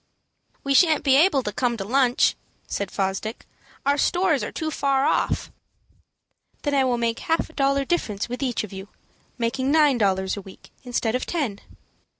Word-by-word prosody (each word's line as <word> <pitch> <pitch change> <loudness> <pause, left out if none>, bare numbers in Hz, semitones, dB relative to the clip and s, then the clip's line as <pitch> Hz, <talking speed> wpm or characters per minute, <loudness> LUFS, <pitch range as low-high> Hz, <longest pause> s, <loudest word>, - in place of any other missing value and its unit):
"We 275 - +1
shan't 315 +1 +4
be 270 -2 +4
able 290 -3 +4
to 210 - -3
come 240 +1 0
to 195 - -4
lunch," 250 +2 +3 0.3
said 200 - -3
Fosdick. 195 +3 -3 0.4
"Our 285 +1 +2
stores 350 -5 +2
are - - -4
too 315 -1 -3
far 275 -2 +1
off." - - 0 1.1
"Then 290 - -1
I 275 -1 +3
will 245 -2 +1
make 230 -1 -1
half 325 0 -1
a - - -24
dollar 275 -1 +1
difference 220 - -1
with 245 +2 -6
each 250 -5 -1
of 210 - -8
you, 190 +1 -8 0.5
making 260 +3 -1
nine 295 -5 +4
dollars 190 -2 +1
a 200 - -6
week 190 0 -15
instead 240 -3 -1
of 250 - -2
ten." 265 - -2
260 Hz, 175 wpm, -24 LUFS, 220-285 Hz, 1.1 s, shan't